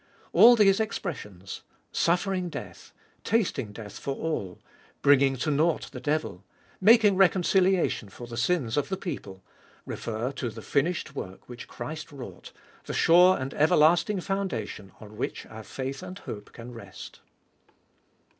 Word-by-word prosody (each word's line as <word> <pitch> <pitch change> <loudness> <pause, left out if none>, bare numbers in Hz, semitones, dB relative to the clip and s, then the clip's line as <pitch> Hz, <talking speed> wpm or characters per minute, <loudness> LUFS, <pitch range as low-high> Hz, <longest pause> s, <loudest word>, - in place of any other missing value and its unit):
All 240 +1 +9
these 195 -3 +5
expressions 130 - -5 0.2
— - - -39
suffering 180 +1 +1
death, - - -9 0.3
tasting 160 - 0
death 105 -1 -9
for 140 - -3
all, 105 - -3 0.5
bringing 140 -1 +5
to 150 +5 -1
nought 155 +3 +1
the - - -7
devil, 145 - -2 0.4
making 210 -1 +6
reconciliation 185 - +3
for 120 - -10
the 120 0 -8
sins 125 -1 0
of 145 - 0
the 190 - -2
people 95 - -7 0.2
— - - -29
refer 115 +3 -3
to 130 -3 -4
the 110 0 -10
finished 155 +1 0
work 95 -9 -8
which 120 0 -9
Christ 155 +1 -7
wrought, 135 -4 -10 0.3
the - - -4
sure 180 +3 +6
and 130 +1 -4
everlasting 165 +6 +3
foundation 175 - -3
on 105 -1 -12
which 125 - -4
our 110 0 -10
faith 135 +4 -5
and 185 - -8
hope 105 - -8
can 120 +1 -10
rest. 100 -6 -11
145 Hz, 145 wpm, -27 LUFS, 115-180 Hz, 0.5 s, All